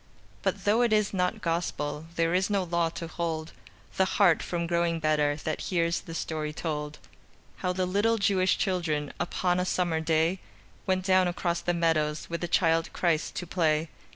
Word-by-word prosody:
But - - -2
though 215 +4 +4
it 240 -2 +3
is 210 -1 +2
not 180 -1 -1
Gospel, 160 -3 -2
There 165 0 +1
is 185 +2 +2
no 200 -2 +1
law 170 -1 0
to 165 - -6
hold 165 -1 -3 0.5
The 190 - +4
heart 180 -6 +5
from 170 -1 -2
growing 170 -1 0
better 150 -2 +2
That 155 +1 -4
hears 170 -1 +1
the 165 - -9
story 155 -2 -3
told: 150 -1 -4 0.6
How 180 - -1
the 185 0 0
little 205 +5 +2
Jewish 190 -3 +2
children 160 -6 -1
Upon 180 +1 0
a - - +1
summer 175 -3 0
day, 160 +3 +1 0.5
Went 185 -1 +1
down 185 -1 +4
across 175 -1 -1
the 175 - 0
meadows 155 -2 0
With 170 - -3
the 175 - -1
Child 165 -1 +2
Christ 165 -3 0
to 180 - -3
play. 160 -2 +1
170 Hz, 180 wpm, -28 LUFS, 160-185 Hz, 0.6 s, heart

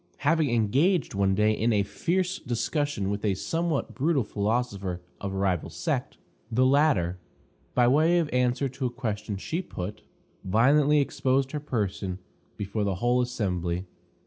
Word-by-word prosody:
Having 155 -1 +3
engaged 135 - +2
one 100 -1 +2
day 105 +2 +3
in 110 +2 +1
a 105 -2 +3
fierce 180 - -1
discussion 120 -3 -1
with 100 0 -3
a 100 -3 +1
somewhat 165 - -1
brutal 145 -1 +1
philosopher 100 -4 -2 0.2
of 100 - -4
a 95 - -4
rival 95 -4 0
sect, - - -3 0.3
the 125 +3 +3
latter, 130 - +3 0.6
by 125 -1 +5
way 155 +7 +4
of 170 -3 +2
answer 125 +2 +2
to 130 0 -3
a - - -2
question 110 -4 -4
she 160 - -3
put, 100 - -6 0.4
violently 140 +9 +4
exposed 135 -1 +1
her 150 - -2
person 100 -9 -2 0.4
before 100 +1 -2
the 100 -2 0
whole 120 +6 +2
assembly. 90 -7 -2
120 Hz, 150 wpm, -27 LUFS, 100-145 Hz, 0.6 s, by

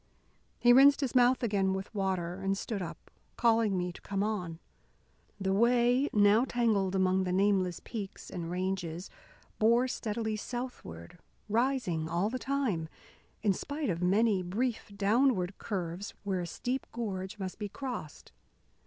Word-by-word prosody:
He 240 0 +6
rinsed 275 +3 +7
his 265 -4 -1
mouth 250 0 +4
again 195 -4 +1
with 190 +3 -6
water, 185 -3 -2
and 195 0 0
stood 205 -1 -4
up, 170 -2 -8 0.3
calling 225 -4 +3
me 180 0 -2
to - - -13
come 200 0 -2
on. 180 -6 -2 0.8
The 190 -1 0
way, 245 +5 +3
now 205 +2 +5
tangled 220 -7 +1
among 190 0 +2
the 180 - -2
nameless 190 -2 +2
peaks 205 -5 -7
and 170 -2 -5
ranges, 180 -1 -3 0.5
bore 235 +3 +4
steadily 220 -2 -2
southward, 205 - -7 0.3
rising 220 -8 0
all 175 +6 0
the 255 - -3
time, 250 - -1 0.5
in 205 -3 +4
spite 285 +3 -3
of 170 0 -3
many 200 +2 +3
brief 215 +5 -2
downward 205 -2 +2
curves 185 -2 -4
where 190 -3 -1
a 175 - -4
steep 250 +9 -3
gorge 195 -4 -4
must 190 -1 -6
be 205 -1 -4
crossed. 245 - -7
200 Hz, 145 wpm, -31 LUFS, 185-235 Hz, 0.8 s, rinsed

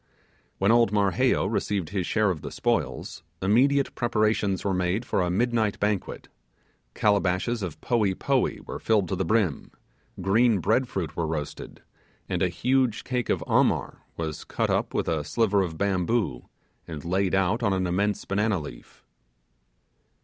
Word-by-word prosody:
When 100 +3 +3
old 115 -2 +4
Marheyo 100 -4 +2
received 100 -6 -1
his 95 -2 -2
share 105 -3 +2
of 80 -5 -5
the - - -6
spoils, 80 - -2 0.2
immediate 130 +9 +3
preparations 110 -4 0
were 100 - +1
made 90 +5 0
for - - 0
a 90 - 0
midnight 110 +2 0
banquet; 105 -2 -2 0.7
calabashes 100 +2 +1
of 90 -6 -5
poee 105 -6 +1
poee - - 0
were - - -6
filled 105 -4 +2
to - - -1
the - - -1
brim; 100 -5 0 0.5
green 110 +4 +3
bread 110 +8 +1
fruit 85 -9 -4
were 85 -2 -1
roasted; 75 -2 -6 0.4
and - - -2
a - - +3
huge 125 -4 +1
cake 125 -2 -2
of - - 0
'amar' - - +1 0.2
was 80 -2 -4
cut - - -1
up - - -1
with - - 0
a 80 -3 0
sliver 105 +3 +1
of 85 -4 -3
bamboo 100 - -1 0.4
and 80 -2 -7
laid 95 +2 +1
out 95 +5 +1
on 115 - +1
an 95 -1 0
immense 100 +4 0
banana 105 0 0
leaf. 75 - -11
100 Hz, 155 wpm, -26 LUFS, 90-110 Hz, 0.7 s, old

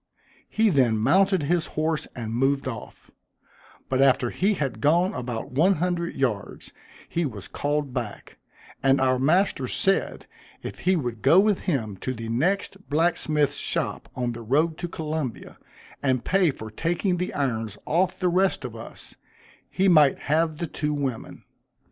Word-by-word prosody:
He 220 -1 +2
then 125 -7 +3
mounted 190 - +3
his 170 +2 0
horse, 155 0 0
and 115 -2 -5
moved 135 +3 +1
off; 115 -3 -8 0.8
but 130 0 +1
after 130 -3 +3
he 200 +3 +1
had 140 -7 -3
gone 170 +6 +3
about 120 -3 -5
one 170 +9 +3
hundred 175 0 -2
yards, 120 -7 -2 0.4
he 170 - -1
was 105 - -5
called 145 -2 -2
back; 120 -5 -6 0.4
and 135 0 +4
our 130 -1 +2
master 155 -1 +2
said, 195 +9 0 0.4
if - - -7
he 185 +1 +2
would 120 -8 -3
go 160 +7 +6
with 205 -1 +3
him 110 - -2
to 130 +6 -4
the 115 0 -6
next 190 +10 -1
blacksmith's 150 -2 +1
shop - - -3
on 125 -1 -1
the 120 0 -7
road 150 +8 +1
to 175 - -3
Columbia, 155 -7 -5 0.4
and 130 -3 0
pay 190 -3 +3
for 110 -6 -6
taking 175 - -1
the 180 +1 -2
irons 115 -7 -2
off 180 +3 +1
the 185 - 0
rest 180 -4 +1
of 120 -2 -6
us, 115 +1 -10 0.6
he 195 - +1
might 155 -6 +6
have 155 +1 0
the 170 - -2
two 150 -1 -2
women. 135 -5 -4
145 Hz, 160 wpm, -25 LUFS, 125-175 Hz, 0.8 s, go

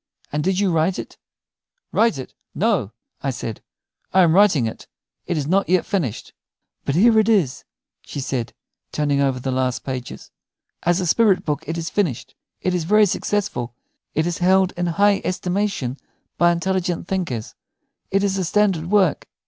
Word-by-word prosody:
And 150 +1 -1
did 190 +1 +1
you 200 -3 +2
write 165 +3 +1
it?" - - -8 0.7
"Write 230 -9 +2
it? 130 - -8 0.2
No," 195 - +1 0.3
I 140 - -1
said; 115 -3 -5 0.5
"I 190 - +5
am 165 -2 +4
writing 185 - +5
it. 110 - -6 0.4
It 175 - -1
is 145 - -1
not 190 +5 +1
yet 185 -1 +3
finished." 155 - -3 0.5
"But 140 - 0
here 220 +5 +5
it 215 +1 +2
is," 185 - +1 0.4
she - - -7
said, 130 -3 -3 0.4
turning 145 -2 +1
over 135 -2 +1
the 130 +1 -3
last 130 -1 -1
pages. 130 -2 -6 0.5
"As 175 +2 +2
a - - -1
spirit 200 +1 +3
book 150 0 -2
it 165 - -3
is 165 0 -4
finished. 175 - -1 0.3
It 185 - 0
is 175 -2 0
very 210 +4 +5
successful; 180 - -2 0.4
it 155 - +2
is 175 -1 -2
held 190 +1 +4
in 175 0 -1
high 200 +4 +3
estimation 180 -8 -2 0.4
by 175 0 +4
intelligent 175 0 -1
thinkers; 165 - -3 0.6
it 195 +1 +1
is 195 -1 0
a - - 0
standard 185 -3 +1
work." 195 -6 +2
175 Hz, 170 wpm, -21 LUFS, 140-195 Hz, 0.7 s, I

